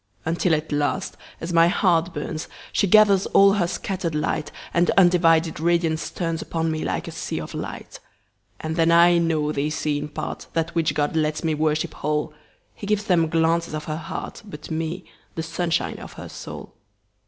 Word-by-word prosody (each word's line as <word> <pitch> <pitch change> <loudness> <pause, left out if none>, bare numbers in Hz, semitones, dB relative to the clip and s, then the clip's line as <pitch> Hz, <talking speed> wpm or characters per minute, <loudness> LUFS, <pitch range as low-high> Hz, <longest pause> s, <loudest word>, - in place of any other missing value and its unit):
Until 165 +1 +2
at 155 +1 -4
last, 145 0 -1 0.2
as 170 +1 -4
my 165 0 +6
heart 175 -2 +2
burns, 155 -1 -5 0.3
She 200 - +2
gathers 200 -1 +5
all 195 0 +6
her 190 -4 +1
scatter'd 180 -3 -3
light, 150 0 -1 0.2
And 170 +1 +3
undivided 165 -4 +4
radiance 165 -1 +1
turnsUpon 165 -1 -2
me 155 0 -2
like - - -2
a - - -5
sea - - -4
of - - -7
light. - - -7 0.6
And 160 +1 -4
then 165 0 +3
I 170 +1 +6
know 160 -3 +1
they 145 0 -1
see 150 -1 -1
in 150 +1 -5
partThat 165 +2 -4
which 165 -3 0
God 145 +1 0
lets 155 0 0
me 160 -1 +1
worship 155 0 0
whole:He 150 +6 -5
gives 210 0 +1
them 170 -5 +2
glances 165 0 +1
of 155 - -4
her 155 0 -4
heart, 165 +7 -6
But 165 -7 -10
me, 165 +3 -3 0.3
the 160 - -3
sunshine 165 +1 -1
of - - -10
her - - -9
soul. - - -9
165 Hz, 175 wpm, -23 LUFS, 155-175 Hz, 0.6 s, my